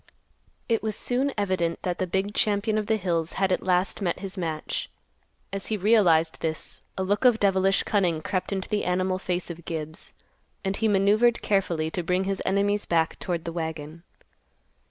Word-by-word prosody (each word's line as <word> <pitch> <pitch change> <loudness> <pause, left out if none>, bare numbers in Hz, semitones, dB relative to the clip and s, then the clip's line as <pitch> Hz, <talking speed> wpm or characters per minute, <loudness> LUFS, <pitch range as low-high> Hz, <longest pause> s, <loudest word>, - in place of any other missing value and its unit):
It 230 -2 +1
was 215 -1 -2
soon 260 +3 0
evident 185 -5 0
that 180 -1 -2
the 185 - 0
big 190 +3 -1
champion 210 +1 +1
of 210 - -4
the 220 - +2
hills 170 -4 -1
had 195 -1 +1
at 185 - +1
last 185 +2 +1
met 175 -3 0
his 195 0 -6
match. 160 -5 -3 0.6
As 195 0 -3
he 215 - -1
realized 180 -6 +3
this, 160 -1 -3 0.2
a 190 - 0
look 205 +5 0
of 245 -3 +5
devilish 195 -1 +3
cunning 180 -6 +1
crept 185 +1 -2
into 190 -1 -2
the 210 - -1
animal 185 +1 0
face 180 -1 -2
of 170 0 -10
Gibbs, 155 -1 -6 0.5
and 190 0 0
he 225 - +1
maneuvered 210 +4 +3
carefully 170 -6 0
to 180 - -2
bring 180 +2 0
his 195 0 -2
enemy's 200 +2 +1
back 165 -1 +1
toward 170 -3 -3
the 165 - -4
wagon. 160 -1 -5
190 Hz, 180 wpm, -26 LUFS, 170-205 Hz, 0.6 s, of